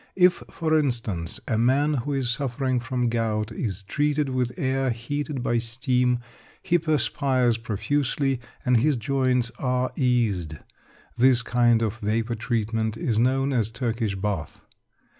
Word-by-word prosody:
If, 180 -1 +4
for 160 -1 0
instance, 115 - -2
a 110 - +1
man 140 +6 +3
who 145 +1 -2
is 130 -3 0
suffering 130 0 -1
from 125 0 -1
gout 115 -2 -1
is 105 -4 -4
treated 145 +6 0
with 125 -2 0
air 135 0 0
heated 135 +3 -3
by 120 -1 +1
steam, 125 +1 +1 0.5
he 175 -1 +2
perspires 135 -6 +1
profusely, 135 +4 -1 0.2
and 125 -1 +4
his 140 +3 +2
joints 125 0 +1
are 125 -1 0
eased. 110 - +1 0.6
This 125 0 +4
kind 120 -1 +3
of 110 +1 -2
vapour 110 +2 -1
treatment 110 -1 -1
is 110 -1 0
known 135 +3 +2
as 115 -4 +1
"Turkish 115 -3 -2
Bath." 95 -5 -3
125 Hz, 140 wpm, -25 LUFS, 115-135 Hz, 0.6 s, If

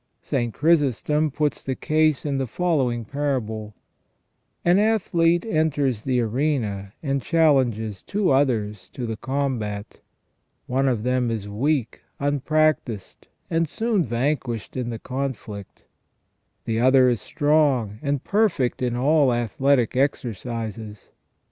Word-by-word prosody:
St. 120 -1 -1
Chrysostom 150 - +2
puts 150 +1 -1
the 130 - -2
case 155 -1 +1
in 140 -2 -1
the 135 - -1
following 130 -7 0
parable: 110 -6 -3 0.4
" - - -46
An 175 +3 +5
athlete 175 -5 +2
enters 145 - 0
the 130 -2 +1
arena 110 -5 -1
and 140 -2 0
chal 165 -1 +4
lenges 110 -6 -1
two 200 -4 0
others 105 -8 0
to 125 -4 -5
the 115 -1 -3
combat. 120 -5 -3 0.7
One 135 +2 +1
of 120 -5 0
them 125 -1 +1
is 110 -3 -3
weak, 125 +4 -1 0.2
unprac 155 +2 +2
tised, 105 -5 -9 0.2
and 165 -1 0
soon 220 -2 0
vanquished 120 -1 -2
in 125 -2 -2
the 115 - -4
conflict: 125 -6 -6 0.8
the 115 0 -1
other 130 +1 +5
is 120 -3 +1
strong, 145 -9 +1
and 140 -2 -1
perfect 195 - +1
in 125 -1 0
all 140 +1 +3
athletic 120 +2 +1
exercises. 115 -5 -3
130 Hz, 130 wpm, -23 LUFS, 115-150 Hz, 0.8 s, An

